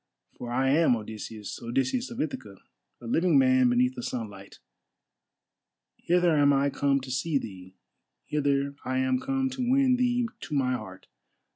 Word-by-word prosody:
For 120 - -7
I 130 +2 +1
am 155 -4 +4
Odysseus, 110 -1 -7
Odysseus 130 - -1
of 235 - -8
Ithaca, 105 -9 -4 0.4
a 120 - -12
living 165 +6 +2
man 130 -1 +4
beneath 125 +1 +2
the 125 - -7
sunlight. 105 -6 -6 1.4
Hither 175 -1 +2
am 145 0 +5
I 140 0 +2
come 140 0 +1
to 130 0 -8
see 140 +4 0
thee, 95 -6 -8 0.5
hither 140 -1 0
I 130 0 -2
am 130 -1 +1
come 265 - -1
to 255 -2 -2
win 265 -1 +4
thee 245 -1 +1
to 150 - -5
my 130 -2 +1
heart. 95 -7 -7
135 Hz, 155 wpm, -27 LUFS, 120-165 Hz, 1.4 s, am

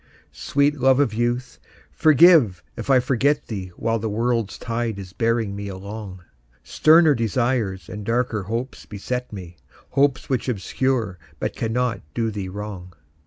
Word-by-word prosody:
Sweet 145 +1 0
love 130 +1 +4
of 135 -7 +2
youth, 120 +3 -2 0.3
forgive 155 - +5
if - - -7
I 130 -1 +6
forget 130 +3 +1
thee 95 -5 -5
While 115 0 -1
the 110 +1 -3
world's 115 0 -1
tide 115 -2 -3
is 95 -2 -9
bearing 115 -3 0
me 100 0 -5
along; 100 -1 -8 0.4
Sterner 160 0 +5
desires 115 -4 -1
and 105 +2 -7
darker 115 0 0
hopes 115 +7 -5
beset 125 +5 -4
me, 90 -4 -9 0.3
Hopes 140 -1 +2
which 130 -1 -1
obscure 115 -2 -1 0.2
but - - -3
cannot 115 -1 -1
do 115 -1 0
thee 100 -3 -5
wrong. 95 -2 -7
115 Hz, 145 wpm, -22 LUFS, 100-130 Hz, 0.4 s, I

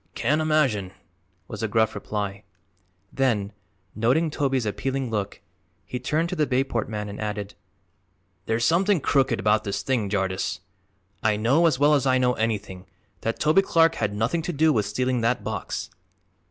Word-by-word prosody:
"Can't 150 +2 +1
imagine," 135 -12 +1 0.5
was - - -7
the - - 0
gruff 110 -1 +2
reply; 100 -1 -4 0.7
then, 110 -7 0 0.4
noting 130 +9 +1
Toby's 135 -5 0
appealing 130 +4 -2
look, 100 -2 -3 0.4
he 125 +5 -5
turned 155 +7 0
to - - -3
the 150 -1 +1
Bayport 125 -4 0
man 105 -1 -4
and 100 +1 -7
added: 105 -1 -4 0.9
"There's 115 +1 +1
something 190 +3 +3
crooked 135 -1 +1
about 105 +1 +2
this 100 -1 -3
thing, 115 -6 0
Jardyce. 95 -2 -1 0.6
I 110 -1 +2
know, 130 +11 +3
as 155 - +1
well 145 +2 +4
as 140 -2 +2
I 130 0 +4
know 125 -1 +2
anything, 105 -5 -3 0.3
that 115 - -3
Toby 155 +5 +4
Clark 165 -4 +3
had 105 -2 -2
nothing 115 +10 0
to 170 - -3
do 155 0 +3
with 105 -3 0
stealing 130 -1 0
that 115 +2 0
box." - - -4
120 Hz, 165 wpm, -25 LUFS, 105-145 Hz, 0.9 s, well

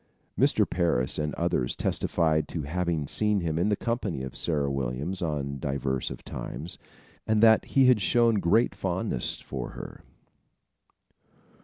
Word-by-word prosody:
Mr. - - +3
Parris 85 -9 0
and 75 0 -1
others - - 0
testified 80 -3 0
to 80 - -4
having 85 0 -1
seen 105 +6 +1
him 80 -1 -1
in 95 +5 +2
the 105 - +2
company 105 - -2
of 65 - -7
Sarah 75 -4 0
Williams 70 +7 -3
on 70 -4 -2
divers 70 -1 -2
of - - -8
times, 85 +4 -5 0.5
and 110 -1 +3
that 110 -1 +6
he 135 -1 +3
had 125 -4 +5
shown 115 +1 +3
great 110 +7 +3
fondness - - -2
for 65 -3 -6
her. - - -9
80 Hz, 145 wpm, -27 LUFS, 70-105 Hz, 0.5 s, that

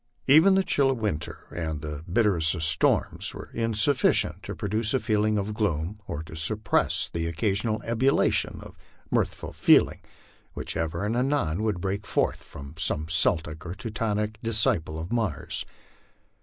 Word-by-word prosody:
Even 160 +8 +6
the 195 - +3
chill 140 -6 +2
of 135 - 0
winter 105 -9 -4
and 80 -3 -3
the 75 0 -6
bitterest 95 -6 +2
of 80 - -3
storms 80 - +2
were - - -9
insufficient 115 +4 +2
to - - -6
produce 110 +4 -1
a - - +2
feeling 110 -2 +1
of 105 +1 -2
gloom, 100 -2 -2
or 75 - -5
to 80 0 -11
suppress 100 +6 +1
the 85 0 -3
oc 85 - -5
casional 105 +5 0
ebullition 120 +4 +1
of - - -14 0.3
mirthful - - -1
feeling - - +4 0.5
which - - -5
ever 80 +4 -2
and 110 +3 -1
anon 125 - 0
would 105 -4 -1
break 100 +3 -3
forth - - 0
from 70 +1 -11
some 75 0 0
Celtic 80 -1 +2
or 90 +1 -6
Teutonic 105 0 -3
disciple 105 -8 +1
of 80 +2 -6
Mars. 110 -10 -2
105 Hz, 155 wpm, -26 LUFS, 80-110 Hz, 0.5 s, Even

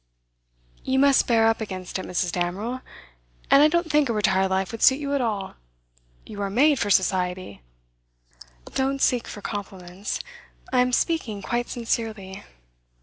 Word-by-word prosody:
'You 265 0 0
must 275 0 +4
bear 225 -2 +4
up 225 0 +2
against 185 -3 -5
it, - - -6
Mrs. 180 -1 -1
Damerel. 195 +9 -3 0.7
And 275 - +8
I 300 - +7
don't 340 +2 0
think 295 -3 +3
a - - +1
retired 190 -3 +2
life 190 0 -1
would 225 - -7
suit 265 - +6
you 285 -1 -3
at 280 - +1
all. 205 -5 -2 0.7
You 205 -1 -8
are 200 - -1
made 275 +7 +3
for 205 - -1
Society.' 185 - 0 1.1
'Don't 270 +1 0
seek 245 -3 +1
for 205 - -8
compliments. 190 -2 -5 0.5
I 255 - +4
am 250 0 +1
speaking 240 - -1
quite 240 0 -2
sincerely. 220 -5 -3
220 Hz, 155 wpm, -24 LUFS, 190-260 Hz, 1.1 s, And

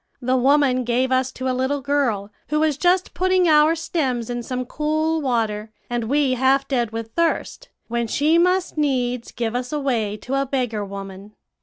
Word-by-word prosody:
The 255 0 0
woman 260 0 +3
gave 250 +2 0
us 260 0 +1
to 260 - -4
a 255 - +1
little 260 +3 0
girl, 250 -8 -1 0.2
who 305 +1 0
was 310 -2 +2
just 360 +5 +1
putting 370 0 +2
our 305 +1 +5
stems 260 -8 -2
in 240 0 -3
some 255 +1 -4
cool 310 +3 -1
water, 225 -5 -1 0.2
and 240 -1 -1
we 275 +2 +2
half 265 +2 +2
dead 240 -4 0
with 225 0 -6
thirst, 335 +8 -1 0.2
when 235 0 -1
she 305 +8 +2
must 360 -2 +1
needs 250 -4 -1
give 230 -2 -3
us 250 0 -3
away 240 -8 -1
to 270 +5 -2
a 275 - -2
beggar 245 -6 -1
woman.' 195 +1 -8
260 Hz, 180 wpm, -22 LUFS, 235-300 Hz, 0.2 s, our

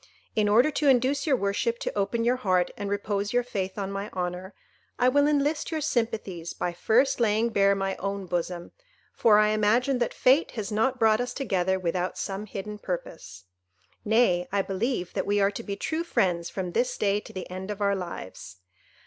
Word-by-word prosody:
In 210 -1 +2
order 240 +8 +5
to 290 0 0
induce 270 +4 +3
your 280 - +4
worship 230 +2 -1
to - - -3
open 205 +3 0
your 245 +2 +2
heart 185 -7 +1
and 205 -1 -4
repose 205 0 -2
your 245 0 +3
faith 195 -6 -4
on 195 -1 -3
my 200 +1 -4
honour, 180 +1 -4 0.4
I 250 - +4
will 285 +2 +3
enlist 295 +1 +1
your 320 - -2
sympathies 225 - -2
by 175 - -2
first 240 +10 +2
laying 225 0 +2
bare 200 -2 +3
my 195 0 -2
own 200 0 -3
bosom; 175 0 -3 0.4
for 215 -3 +5
I 210 0 +4
imagine 230 +5 +2
that 240 - 0
fate 270 +6 +3
has 215 0 -3
not 250 +5 +1
brought 220 -1 +3
us 245 - -4
together 190 -8 0
without 180 0 -2
some 200 +1 -4
hidden 210 +1 -6
purpose. 165 - -6 0.6
Nay, 210 -5 +2
I 200 0 +1
believe 195 -1 -2
that - - -2
we 205 0 +2
are 200 0 +3
to 205 - -6
be 200 -3 -5
true 315 +9 -2
friends 175 - 0
from 185 -2 -4
this 245 +5 0
day 205 0 +1
to - - -12
the 185 -2 -6
end 185 +2 -6
of 210 -1 -4
our 200 -1 +2
lives. 100 - -7
205 Hz, 195 wpm, -27 LUFS, 190-240 Hz, 0.6 s, order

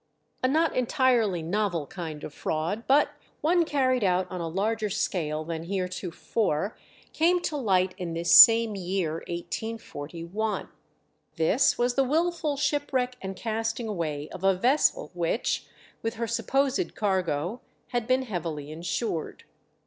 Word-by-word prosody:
A 255 - +3
not 315 +4 +2
entirely 245 - +2
novel 175 -2 -1
kind 160 -3 -7
of 145 - -7
fraud, 165 +11 -2
but 285 +2 +5 0.3
one 340 +3 +3
carried 255 -5 +1
out 185 -1 +2
on 180 -1 -4
a 165 - -2
larger 210 +5 -1
scale 155 -6 -1
than 165 0 -5
heretofore, 185 0 -2 0.4
came 345 +3 +3
to 310 - -2
light 190 -8 +2
in 170 -2 -4
this 170 +1 +2
same 225 -2 +9
year, 180 -4 -2
1841. 175 +1 -4 0.7
This 165 +11 +3
was 245 +1 +1
the 270 - +3
wilful 315 +1 0
shipwreck 275 -4 0
and 190 0 -5
casting 225 +1 -2
away 155 -7 -3
of 185 0 -9
a 195 -1 +4
vessel 255 +10 +2
which, 175 +6 -1 0.3
with 225 +1 -3
her 230 +1 -2
supposed 275 - 0
cargo, 185 - -1 0.3
had 240 -2 -2
been 255 +1 +2
heavily 165 - -4
insured. 170 +2 -3
205 Hz, 135 wpm, -27 LUFS, 170-250 Hz, 0.7 s, same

